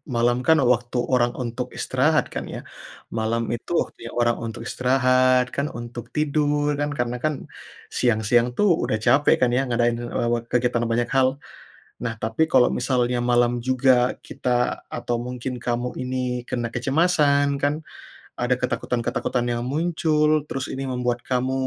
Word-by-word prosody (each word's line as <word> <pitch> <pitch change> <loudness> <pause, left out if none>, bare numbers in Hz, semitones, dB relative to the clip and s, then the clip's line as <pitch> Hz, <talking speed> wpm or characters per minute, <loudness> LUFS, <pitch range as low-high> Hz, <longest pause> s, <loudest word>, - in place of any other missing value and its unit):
malam 120 +1 +2
kan 160 -1 +6 0.2
waktu 120 +1 -4 0.2
orang 120 -1 +3
untuk 120 +1 -4
istirahat 150 +4 +2
kan - - -4
ya, - - -5 0.6
malam 115 +1 0
itu 115 - -10
waktunya 115 +1 -7
orang 120 0 +3
untuk 115 +1 -6
istirahat 130 0 +3
kan, 140 +1 0
untuk 120 0 -7
tidur 150 -1 +1
kan 145 0 0
karena 120 0 -1
kan 155 0 +1 0.6
siang-siang 115 0 +3
tuh 210 - +3 0.2
udah 110 - 0
capek 145 +2 +5
kan 125 - +4
ya - - +3
ngadain, 120 0 +1
eee, 120 0 -2
wat 120 0 -2
kegiatan 120 -1 +1
banyak 120 +1 +1
hal. 130 -1 +5 0.8
Nah 115 -1 -2
tapi 110 +8 0
kalau 125 - +6
misalnya 125 -1 +1
malam 120 0 +3 0.2
juga 130 0 +4 0.3
kita 125 - -3 0.4
atau 120 - -2
mungkin 125 +1 -4
kamu 120 +1 -1
ini 130 0 -3 0.3
kena 120 -1 -2
kecemasan 145 +1 +2
kan, 145 +1 +2 0.7
ada 125 +1 +2
ketakutan-ketakutan 120 0 -1
yang 120 0 -2
muncul 155 -1 +1 0.2
terus 135 -1 -3
ini 135 +1 -4
membuat 125 -1 -1
kamu 130 0 0
125 Hz, 150 wpm, -23 LUFS, 120-135 Hz, 0.8 s, kan